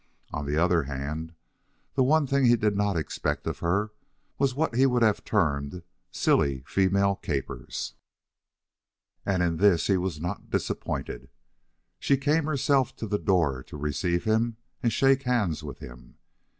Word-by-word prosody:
On 75 -1 -3
the 75 +1 0
other 85 0 +3
hand, 75 +4 -5 0.6
the 140 - +1
one 150 +4 +4
thing 140 0 +2
he 120 0 +6
did 105 -2 +1
not 100 -2 +1
expect 80 - -2
of - - -3
her 100 +5 0 0.5
was 135 -2 +1
what 155 -2 0
he 130 +3 +4
would 125 -2 +2
have 110 -2 +2
termed 75 -4 0 0.3
"silly 65 -2 +1
female 100 +3 +2
capers." 70 -7 -4 1.3
And 95 -3 +2
in 85 -2 0
this 95 -3 +4
he 95 - +3
was 90 -3 -2
not 85 +3 -5
disappointed. - - -3 0.7
She 140 - +2
came 150 +3 +1
herself 140 -3 +1
to - - -5
the 105 -1 -1
door 80 -10 +1
to 75 - -10
receive 85 +4 -1
him 110 +1 +1 0.2
and 120 - +1
shake 135 +1 +3
hands 115 - 0
with 70 -4 -7
him. - - -12
100 Hz, 155 wpm, -27 LUFS, 80-120 Hz, 1.3 s, he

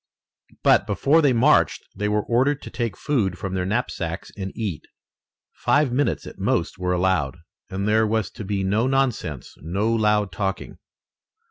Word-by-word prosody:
But - - +4
before 155 +4 +3
they 145 -3 +4
marched 125 +5 +3
they 105 0 -1
were 105 0 +1
ordered 135 +5 +1
to - - -8
take 115 -5 -3
food 100 -11 0
from 95 0 -5
their 90 -1 -1
knapsacks 95 -6 -3
and 95 -2 -5
eat. 100 -9 -4 0.7
Five 145 -3 +2
minutes 140 +4 0
at - - -10
most - - 0
were 90 0 0
allowed, 90 -5 +1 0.3
and 100 +2 -3
there 110 +1 +3
was 110 -1 -1
to - - -8
be 100 0 -2
no 105 +6 +1
nonsense, 130 - -1
no 100 +8 0
loud 105 -3 +2
talking. 95 +2 -4
105 Hz, 160 wpm, -23 LUFS, 95-120 Hz, 0.7 s, But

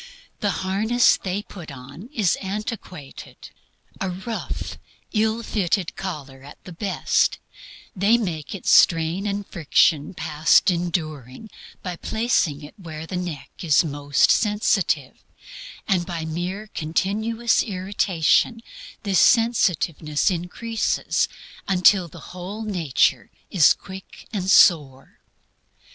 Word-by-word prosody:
The 205 - 0 0.2
harness 220 +6 +3
they 195 +2 -4
put 175 -7 -11
on 140 - -11
is 215 - +1
antiquated. 195 - -7 0.5
A 190 - -2
rough, 190 +6 -5 0.3
ill 220 +1 +1
fitted 195 -4 -1
collar 140 -8 -7
at 145 +2 -13
the 180 - -10
best, 190 +2 0 0.6
they 205 +5 +4
make 175 -8 -4
its 195 - -1
strain 165 +4 +4
and 200 0 -3
friction 160 0 +1
past 155 +5 +3
enduring, 165 - -4 0.3
by 180 -2 -5
placing 205 -12 0
it 145 - -11
where 160 -3 -8
the 180 - -6
neck 170 -6 -5
is 160 -3 +3
most 145 -1 +2
sensitive; 205 - 0 0.6
and 185 -3 +2
by 170 -2 -5
mere 175 +6 -4
continuous 220 +8 0
irritation 190 +2 +1 0.4
this 195 -4 +2
sensitiveness 175 -9 +2
increases 185 +6 -1 0.4
until 185 -1 +4
the 155 - -13
whole 190 +5 -6
nature 175 - +1 0.2
is 165 -5 +6
quick 190 0 -12
and 190 -3 -2
sore. 145 -9 +4
180 Hz, 110 wpm, -23 LUFS, 160-205 Hz, 0.6 s, is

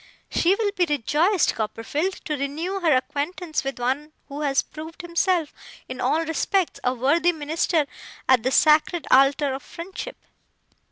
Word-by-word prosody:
She 360 +3 +3
will 420 -1 0
be 365 -3 +1
rejoiced, 300 - +2
Copperfield, 230 - -3
to 300 - -1
renew 310 +8 -3
her 325 -6 +3
acquaintance 310 +6 -2
with 270 0 -4
one 270 +5 -2 0.2
who 285 +2 -6
has 275 -2 +2
proved 320 +2 -10
himself 345 -2 0 0.3
in - - -6
all 325 +1 +1
respects 345 +3 0
a 250 - +2
worthy 300 +8 +3
minister 315 0 0 0.4
at 260 -3 +5
the 250 - 0
sacred 310 +4 +3
altar 275 +1 +4
of 270 - -5
friendship. 375 +8 -8
310 Hz, 150 wpm, -24 LUFS, 275-345 Hz, 0.4 s, at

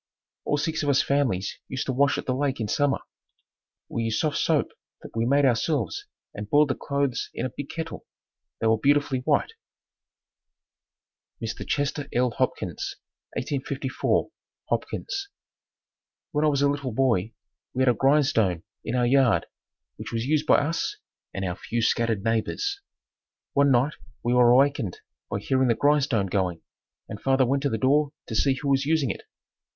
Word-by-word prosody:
All 145 - +1
six 160 +2 -1
of 145 - 0
us 140 - +4
families 125 -9 0
used 130 0 -3
to 130 - -1
wash 140 +2 +3
at - - -4
the 130 - 0
lake 135 0 -1
in 110 - -1
summer. 145 +5 +1 0.9
We 115 - -3
used 110 -1 0
soft 155 -2 0
soap - - +2 0.3
that - - -11
we 115 +1 +1
made 140 +2 +4
ourselves 125 - 0 0.3
and 105 0 -7
boiled 145 +2 +4
the - - +2
clothes 140 -3 -1
in 120 - -2
a 130 - -3
big 145 - -6
kettle. 165 0 -6 0.5
They - - -2
were 110 -1 +3
beautifully 145 0 +2
white. 145 - +1 1.9
Mr. - - -5
Chester 145 0 -1
L. 125 0 +2
Hopkins - - -2 0.4
1854, 135 -1 -1 0.4
Hopkins. 395 0 -2 1.0
When 150 +1 +1
I - - +4
was 140 -2 +2
a - - +5
little 140 -4 -2
boy 115 -4 +1 0.4
we 130 - +2
had 130 - +4
a - - +5
grindstone 120 - +2 0.2
in 120 - -2
our 125 -1 +2
yard 130 -2 +4 0.5
which - - -7
was 115 0 -2
used 150 +2 +1
by - - +6
us 160 +4 -2 0.3
and 95 - -3
our 90 -1 -2
few 115 +5 -3
scattered 115 -2 +1
neighbors. 120 - -1 0.7
One 140 0 +4
night 135 +3 +3 0.3
we 120 +1 +1
were 125 -1 +6
awakened 130 -5 +3 0.3
by 100 - -3
hearing 130 +4 +2
the 115 - +3
grindstone 145 -7 +2
going, 90 -3 -1 0.4
and 105 -2 -8
father 135 -1 +3
went 135 +3 +1
to 140 - +1
the 110 - -1
door 140 +5 +2
to - - -7
see 135 +4 +2
who 140 +2 -3
was 135 0 +3
using 155 -6 +2
it. - - -8
135 Hz, 170 wpm, -26 LUFS, 115-145 Hz, 1.9 s, by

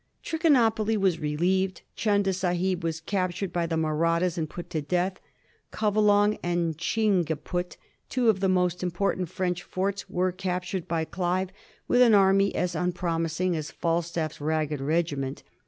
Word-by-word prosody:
Trichinopoly 230 -9 +2
was 190 -4 +1
relieved; 180 +5 0
Chunda 200 -3 +1
Sahib 180 0 -1
was 165 -1 -2
captured 185 +1 -2
by 170 -1 0
the 165 - -1
Mahrattas 165 +2 +1
and 160 -3 -2
put 175 - -8
to 155 - -1
death; 180 +5 -1 0.5
Covelong 210 -1 +3
and 175 -2 0
Ghing 195 +3 +1
keput, 175 +3 -4 0.3
two 250 -2 +1
of 215 -4 +4
the 190 0 +1
most 180 -1 +1
important 180 0 -1
French 180 -1 -2
forts, 195 +3 -3
were 185 +1 0
capt 180 0 -3
ured 185 -4 -3
by 165 -1 -1
Clive 180 +2 -1 0.4
with 245 - +4
an 235 -4 +7
army 195 0 +4
as 180 -1 0
unpromising 170 0 -1
as 155 -1 -4
FalstafPs 165 -2 -2
ragged. 150 -1 -1
regiment. 145 -3 -1
180 Hz, 150 wpm, -27 LUFS, 165-195 Hz, 0.5 s, an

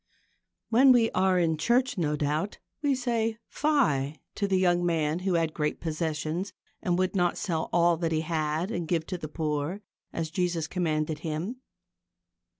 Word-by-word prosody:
When 260 +4 +7
we 235 -2 +4
are 185 0 +2
in 165 -3 +2
church, 250 - +2
no 155 -6 0
doubt, 150 +7 -1 0.2
we 285 -2 +2
say 230 -3 -1
fie 155 - +1 0.2
to 200 - -1
the 190 -1 +2
young 175 -1 +3
man 160 -2 +1
who 185 -1 0
had 165 -2 +1
great 150 -1 -1
possessions 160 +3 -2 0.3
and 175 -1 +1
would 185 +1 0
not 175 -2 +2
sell 165 -6 -2
all 170 -1 +4
that 165 -1 -1
he 160 -1 +1
had 160 +3 -1
and 170 -2 -3
give 165 -1 0
to 185 - -4
the 155 - -5
poor, 155 +4 -2 0.3
as 160 -1 -3
Jesus 175 -2 0
commanded 155 -3 -1
him. 165 +9 -3
170 Hz, 165 wpm, -28 LUFS, 155-190 Hz, 0.3 s, When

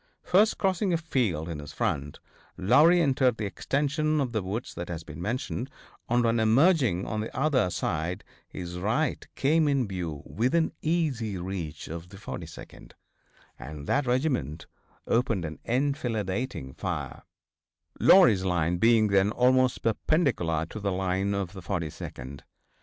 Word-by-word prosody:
First 205 +4 +3
crossing 190 0 +1
a - - +3
field 115 - -1
in 80 -3 -5
his 75 -1 -9
front, 70 +1 -2 0.4
Lowrey 145 - +5
entered 130 -5 +2
the 110 - -3
extension 150 +8 0
of 130 -4 -1
the 110 -3 -1
woods 100 +6 -4
that 85 0 -6
has 85 -2 -5
been 80 0 -9
mentioned, 125 +4 -3 0.4
and 120 0 +2
on 115 0 +2
emerging 120 - +3
on 110 - -3
the 110 - -5
other 135 -9 +2
side 85 +1 -2 0.3
his 90 -1 -6
right 120 - -1
came 155 +3 +2
in 135 -5 +1
view 85 -7 -5
within 150 +9 +1
easy 140 - -1
range 85 -4 -5
of 85 +2 -7
the 100 - -12
42d, 85 -4 -9 0.7
and 75 -2 -8
that 140 - +1
regiment 125 - -1 0.4
opened 115 -7 +1
an 80 -1 -7
enfilading 120 - -2
fire, - - -4 0.8
Lowrey's 115 - +6
line 90 -2 +1
being 115 +2 +4
then 100 0 +3
almost 125 +2 +2
perpendicular 110 - +1
to 110 - -8
the 100 -1 -1
line 95 +2 0
of 95 -2 -3
the 95 - -8
42d. 75 -7 -5
110 Hz, 145 wpm, -27 LUFS, 90-135 Hz, 0.8 s, Lowrey's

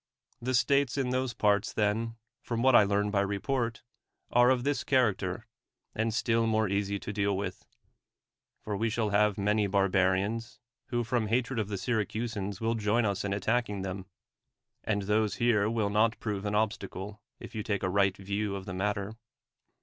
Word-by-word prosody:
The 130 +2 0
states 140 +1 +2
in 130 -2 0
those 130 -2 -1
parts, 105 -2 +2
then, 110 +2 0 0.3
from 115 0 -2
what 130 0 +5
I 110 - +8
learn 100 +1 +1
by 100 -1 +2
report, 115 +4 -2 0.5
are 120 +1 +5
of 130 -2 +2
this 140 0 0
character, 110 -7 +1 0.5
and 110 +1 0
still 115 0 +1
more 110 -1 +2
easy 100 +1 -1
to 105 - -6
deal 100 -1 0
with 100 - -5 0.5
— - - -55
for 105 - -3
we 110 +3 0
shall 110 -1 -1
have 105 0 +3
many 105 +1 +1
barbarians, 100 +3 +1 0.3
who 120 -1 -1
from 115 -1 0
hatred 120 +2 0
of 105 - -1
the 100 -1 -3
Syracusans 110 -2 -2
v/ill 115 +1 0
join 110 +1 +1
us 100 -2 -1
in 100 - -2
attacking 105 0 0
them 95 0 -5 0.4
— - - -55 0.3
and 105 -2 -1
those 105 0 +1
here 110 -3 +2
will 110 -3 0
not 110 +2 +2
prove 105 -2 -3
an 105 0 -1
obstacle, 105 -1 -2 0.2
if - - -10
you 110 - -3
take 100 -2 -2
a - - +2
right 100 0 +2
view 100 +1 -2
of 95 -1 -6
the 95 - -5
mat 100 +3 0
ter. 100 +1 -5
105 Hz, 185 wpm, -29 LUFS, 100-115 Hz, 0.5 s, I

